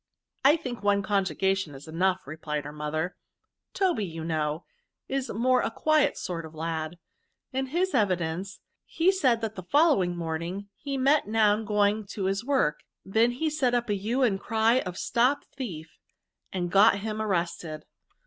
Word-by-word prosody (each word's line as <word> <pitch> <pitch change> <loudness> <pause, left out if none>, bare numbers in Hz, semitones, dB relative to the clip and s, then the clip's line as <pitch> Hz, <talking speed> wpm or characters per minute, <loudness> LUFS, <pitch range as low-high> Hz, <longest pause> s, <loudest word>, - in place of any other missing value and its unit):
^^ - - -61 0.4
I 280 +3 +7
think 245 -8 -6
one 205 -1 +2
conjugation 190 -4 0
is 135 +4 -11
enough," 180 +3 0
re 145 +3 -7
plied 150 -2 -3
her 145 - -6
mother. 150 +4 -3 0.3
" - - -60
Toby, 360 - +1
you 165 -3 -5
know, 155 0 -2 0.4
is 270 -1 -2
a - - -4
more 250 +3 +3
quiet 310 +5 +2
sort 170 -3 -4
of 160 0 -11
lad; 160 +1 -3 0.6
in 265 +1 -1
his 355 +6 0
evidence, 185 -4 0 0.2
he 345 +3 +2
said, 260 -12 +2
that 220 -1 -2
the 185 - -7
following 195 - +3
morning 170 +4 -4
he 280 -2 -4
met 275 +1 +3
Noun 215 0 +3
going 210 0 +1
to 200 - -4
his 195 +3 0
work; 255 - +1 0.2
he 190 - -13
then 240 +8 +2
set 260 -5 +1
up 240 -3 0
a - - +3
hue 225 +7 0
and 200 -6 +2
cry 225 +3 +2
of 180 -6 -5
stop 255 +8 +1
thief, 170 - -7 0.5
and 175 -2 -2
got 200 +1 +5
him 215 0 -3
ar« 215 - -2
rested. 170 -4 -2
200 Hz, 175 wpm, -27 LUFS, 170-245 Hz, 0.6 s, I